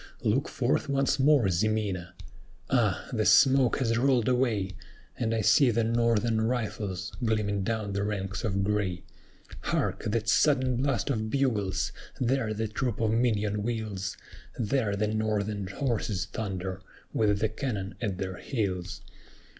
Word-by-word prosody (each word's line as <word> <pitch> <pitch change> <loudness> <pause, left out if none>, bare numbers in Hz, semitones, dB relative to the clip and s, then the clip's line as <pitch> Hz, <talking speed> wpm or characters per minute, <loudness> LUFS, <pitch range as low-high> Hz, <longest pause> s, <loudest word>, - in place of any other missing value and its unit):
Look - - +1
forth - - 0
once 135 0 +1
more, 135 -5 +5
Ximena! 95 -2 -1 0.6
"Ah! - - +1
the - - +1
smoke 130 -2 +5
has 115 -3 +1
rolled 125 -3 +3
away; 120 -6 +1 0.4
And 115 -2 -1
I 115 -1 +1
see 135 +3 +5
the 115 0 +1
Northern 115 -1 +2
rifles 105 -5 -2
gleaming 105 -3 0
down 110 -1 -2
the 100 - -1
ranks 95 -1 -3
of 100 -3 0
gray. 100 -3 -1 0.6
Hark! - - -1
that 110 0 -1
sudden 130 +3 +3
blast 135 0 0
of 110 -3 -2
bugles! 110 -8 0 0.3
there 125 -2 +1
the 110 +1 -2
troop 115 +1 -2
of 110 -1 +1
Minon 105 -3 +1
wheels; 105 -4 -3 0.4
There 110 -2 0
the 105 +1 0
Northern 105 -2 -1
horses 105 -4 -1
thunder, 95 -2 -4 0.3
with 105 -2 +2
the 110 +2 +1
cannon 110 -4 -3
at 100 -5 -2
their 95 -1 -4
heels. 95 -8 -3
110 Hz, 140 wpm, -28 LUFS, 100-120 Hz, 0.6 s, more